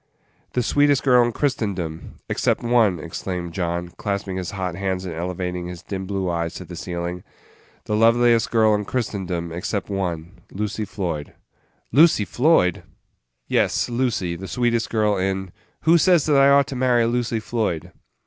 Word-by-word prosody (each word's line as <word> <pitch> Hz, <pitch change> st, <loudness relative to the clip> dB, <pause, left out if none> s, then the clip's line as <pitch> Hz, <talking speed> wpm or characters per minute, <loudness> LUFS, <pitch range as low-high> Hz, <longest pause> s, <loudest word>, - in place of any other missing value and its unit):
"The 125 Hz, -, +1 dB
sweetest 145 Hz, +2 st, +3 dB
girl 125 Hz, -3 st, +5 dB
in 120 Hz, -, 0 dB
Christendom 100 Hz, -, -3 dB
except -, -, 0 dB
one," 115 Hz, -6 st, +3 dB
exclaimed 85 Hz, +1 st, -5 dB
John, 85 Hz, -1 st, -2 dB
clasping 95 Hz, +1 st, -4 dB
his 90 Hz, -2 st, -3 dB
hot 95 Hz, -3 st, -3 dB
hands 95 Hz, 0 st, -2 dB
and 90 Hz, -, -4 dB
elevating 90 Hz, +1 st, -4 dB
his 90 Hz, -1 st, -8 dB
dim 95 Hz, -1 st, -5 dB
blue 95 Hz, -1 st, -2 dB
eyes 85 Hz, 0 st, -2 dB
to 90 Hz, -, -7 dB
the 90 Hz, -, -9 dB
ceiling; 85 Hz, 0 st, -5 dB, 0.6 s
"the 105 Hz, -, -1 dB
loveliest 115 Hz, +1 st, +4 dB
girl 110 Hz, -2 st, +4 dB
in 105 Hz, 0 st, 0 dB
Christendom, 95 Hz, -8 st, -3 dB
except 95 Hz, +4 st, -3 dB
one 90 Hz, -2 st, -3 dB
Lucy 105 Hz, +2 st, -3 dB
Floyd." 85 Hz, -7 st, -4 dB, 0.6 s
"Lucy 145 Hz, -5 st, +5 dB
Floyd!" 120 Hz, -, +2 dB, 0.7 s
"Yes, -, -, +1 dB
Lucy; 120 Hz, -8 st, -1 dB
the 95 Hz, +3 st, -7 dB
sweetest 120 Hz, 0 st, 0 dB
girl 105 Hz, -2 st, +1 dB
in 95 Hz, 0 st, -2 dB
" -, -, -40 dB
"Who 165 Hz, +2 st, +5 dB
says 175 Hz, -3 st, +4 dB
that 150 Hz, -, +3 dB
I 135 Hz, 0 st, +6 dB
ought 140 Hz, 0 st, +5 dB
to 135 Hz, -, -5 dB
marry 125 Hz, -2 st, +3 dB
Lucy 120 Hz, -1 st, 0 dB
Floyd?" 90 Hz, -7 st, -2 dB
100 Hz, 160 wpm, -22 LUFS, 90-120 Hz, 0.7 s, I